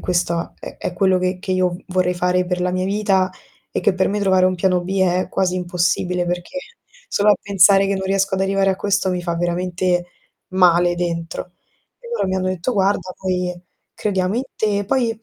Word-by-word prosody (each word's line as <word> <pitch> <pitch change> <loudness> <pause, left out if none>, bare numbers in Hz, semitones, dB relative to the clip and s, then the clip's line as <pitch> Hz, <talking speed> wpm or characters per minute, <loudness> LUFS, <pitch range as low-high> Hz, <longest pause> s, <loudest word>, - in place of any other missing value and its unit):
questa 170 -1 -1
è - - -9
è - - -4
quello 190 0 +2
che 185 0 -1
io 185 -1 +1
vorrei 180 -1 +1
fare 180 +1 +1
per 180 0 -2
la 180 - +1
mia 185 0 -1
vita, 195 -1 +1 0.4
e - - -2
che 190 - +2
per 190 - +1
me 205 +1 -1
trovare 190 -2 +3
un 185 - +2
piano 180 0 +1
B 190 +2 -2
è 185 0 +2
quasi 185 -1 0
impossibile 180 0 0
perché 175 +10 -3 0.5
solo 210 - +3
a - - +6
pensare 195 0 +5
che 200 - 0
non 190 - -3
riesco 195 0 +1
ad 190 - 0
arrivare 195 0 +2
a 190 - -1
questo 200 -1 0
mi 180 -1 -1
fa 170 -1 -2
veramente 175 +1 0 0.4
male 175 -1 +4
dentro." 170 0 -4 0.5
E 480 - -15
loro 330 - 0
mi 190 - 0
hanno 185 0 -1
detto: 185 +6 -2
"Guarda 195 -1 +1
noi 180 -1 -1 0.4
crediamo 190 -1 -1
in 250 - 0
te". 205 -2 0
Poi, 235 -1 0
185 Hz, 195 wpm, -20 LUFS, 180-195 Hz, 0.5 s, a